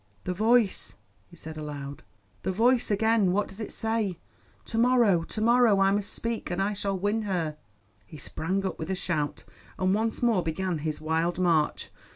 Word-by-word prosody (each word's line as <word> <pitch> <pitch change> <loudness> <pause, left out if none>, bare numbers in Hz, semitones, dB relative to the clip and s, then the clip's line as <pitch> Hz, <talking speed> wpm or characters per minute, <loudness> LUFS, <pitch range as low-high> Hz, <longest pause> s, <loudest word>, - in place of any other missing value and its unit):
"The 180 - -2
Voice," 220 +1 +2 0.3
he 175 - -16
said 160 -1 -9
aloud; 145 -2 -6 0.4
"the - - -1
Voice 240 +5 +3
again. 210 -2 +3
What 205 +1 +1
does 195 - -13
it 215 - -5
say? 220 -5 -1 0.5
To 225 - -2
morrow, 235 -7 +4
to 215 +6 -6
morrow 235 -3 +5
I 195 0 +4
must 205 0 -1
speak; 230 -1 -4
and 175 +1 -2
I 200 +2 +1
shall 200 -1 -2
win 205 +4 0
her." 175 -7 -2 0.5
He 155 - -11
sprang 185 +7 -2
up 190 - -3
with 160 - -5
a 190 - 0
shout, 155 -5 -2 0.3
and 185 0 +2
once 225 +3 -1
more 230 -6 +3
began 175 +1 -2
his 155 0 -3
wild 160 +2 0
march. 170 -4 +1
195 Hz, 185 wpm, -27 LUFS, 165-220 Hz, 0.5 s, morrow